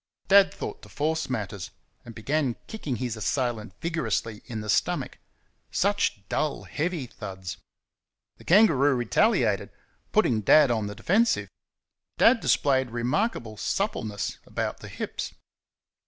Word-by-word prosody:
Dad 200 0 +7
thought - - -6
to - - -14
force 160 +1 -1
matters, 105 -6 -4 0.3
and 120 -2 -11
began 135 +1 0
kicking 155 - -4
his 120 -2 -3
assailant 110 -3 -2
vigorously 115 -10 -2
in 115 -4 -5
the 105 - -7
stomach. - - 0 0.5
Such 195 - 0
dull, 150 -2 -1
heavy 165 -2 -2
thuds! 95 -6 -7 0.8
The - - -16
kangaroo 155 -8 +5
retaliated, 120 -3 +2 0.4
putting 110 -3 +3
Dad 140 +6 +6
on 110 -3 0
the 105 - -6
defensive. 220 - +2 0.7
Dad 230 +1 +6
displayed 130 - +2
remarkable 120 - -1
suppleness 110 - -2
about - - -3
the - - -9
hips. - - -5
125 Hz, 125 wpm, -26 LUFS, 110-160 Hz, 0.8 s, Dad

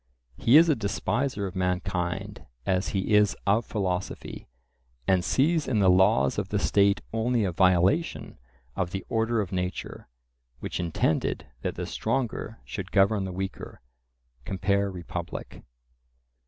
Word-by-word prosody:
He 120 - +5
is 165 +2 +7
a 155 - +3
despiser 110 +1 -1
of 95 - -6
mankind 90 +2 -2 0.2
as 95 0 +1
he 95 +2 -1
is 105 -1 +4
of 105 +3 +2
philosophy, 95 -4 -3 0.6
and 95 -2 +3
sees 155 - +2
in 125 - +1
the 95 -3 +5
laws 90 -8 +3
of - - -4
the - - 0
state 100 0 +3
only 115 +1 +1
a 95 - 0
violation 95 - +2 0.4
of 90 - -1
the 95 +2 -5
order 115 0 +1
of 95 -2 -5
nature, 90 -7 -4 0.5
which - - -4
intended 85 -2 0 0.2
that - - -3
the - - -4
stronger 120 -3 -2
should 95 -2 -6
govern 100 +2 +3
the 95 - -4
weaker 95 +1 -6 0.6
(compare 100 +4 0
Republic). 90 -3 -6
100 Hz, 140 wpm, -27 LUFS, 90-110 Hz, 0.6 s, is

